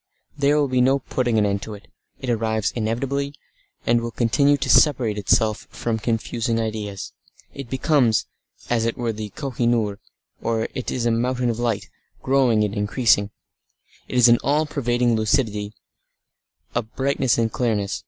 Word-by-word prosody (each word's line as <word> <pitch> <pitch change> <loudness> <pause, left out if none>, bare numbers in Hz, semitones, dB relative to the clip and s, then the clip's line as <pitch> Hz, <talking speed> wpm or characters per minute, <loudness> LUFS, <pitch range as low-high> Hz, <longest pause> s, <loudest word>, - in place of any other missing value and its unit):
There 145 0 +2
will 145 -1 +2
be 130 -1 +1
no 135 +2 +4
putting 125 -3 -1
an 105 - +3
end 100 -1 -1
to 110 +1 -7
it. 100 - -15 0.3
It 130 - -2
arrives 110 -2 0
inevitably, 135 +5 -2 0.5
and 120 0 +3
it - - -5
will 120 - -3
continue 125 +5 +2
to - - -3
separate 125 -8 +4
itself 110 +2 +1
out - - -16
from 115 -2 -1
confusing 115 +1 -1
ideas. 105 -3 -4 0.4
It 135 -3 -8
becomes, 130 -4 +2 0.4
as 115 -2 +1
it 115 - -1
were 120 -2 -1
the 105 0 -6
Koh 140 -3 -5
i 120 - +2
noor; 110 -4 +1 0.4
it 115 +2 -2
is 120 -2 -2
a 120 - +3
Mountain 125 +1 0
of 115 - -5
Light, 115 -4 -1 0.4
growing 130 -5 +3
and 105 -1 -1
increasing. 105 0 +2 0.8
It 125 - -3
is 125 -1 +7
an 120 0 +5
all 150 +3 +2
pervading 120 -5 0
lucidity, 110 -3 0 1.0
a 120 - +1
brightness 130 +3 0
and 115 -1 +1
clearness. 105 -5 -1
115 Hz, 170 wpm, -22 LUFS, 110-130 Hz, 1.0 s, is